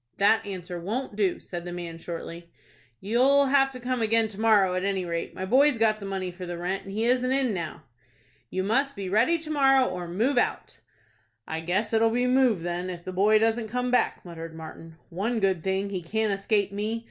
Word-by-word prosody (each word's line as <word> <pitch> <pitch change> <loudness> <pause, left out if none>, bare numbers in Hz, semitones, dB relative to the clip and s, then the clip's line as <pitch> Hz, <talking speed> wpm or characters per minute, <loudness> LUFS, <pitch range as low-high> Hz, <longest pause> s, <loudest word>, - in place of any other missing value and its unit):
"That 205 +3 +4
answer 180 -2 -6
won't 215 +6 -4
do," 200 -4 0
said 175 -2 -7
the 175 - -6
man, 170 -2 -6
shortly. 170 0 -7 0.5
"You'll 260 +7 +4
have 270 0 +4
to 255 -1 -9
come 250 0 -2
again 225 0 +2
to 210 0 -7
morrow, 205 -5 +4
at 185 0 -1
any 195 -2 -1
rate. 170 -1 -4
My 185 - -4
boy's 270 +5 +4
got 215 -1 +2
the 200 - -7
money 190 -2 -3
for 180 +1 -10
the 175 0 -5
rent, 180 +3 -3
and 195 - -8
he 220 +3 -1
isn't 255 +1 +2
in 265 -4 +1
now." 170 -5 -5 0.7
"You 185 - -2
must 270 +8 +1
be 195 -2 -5
ready 230 - +3
to 315 -1 -7
morrow, 270 -3 +4
or 180 -1 -5
move 235 +10 +1
out." - - -2 0.7
"I 160 - -3
guess 185 +7 -1
it'll 225 0 +4
be 245 +2 0
move 250 -8 +3
then, 175 +1 -3
if 175 -2 -7
the 185 - -6
boy 205 +4 +4
doesn't 225 +1 +1
come 250 +2 -1
back," 250 - +1
muttered 165 -2 -8
Martin. 160 0 -10
"One 220 +7 -1
good 190 -5 +1
thing, 190 +1 -1
he 185 -2 -3
can't 215 +4 -1
escape 200 0 0
me. 210 +3 -2
200 Hz, 215 wpm, -26 LUFS, 180-240 Hz, 0.7 s, That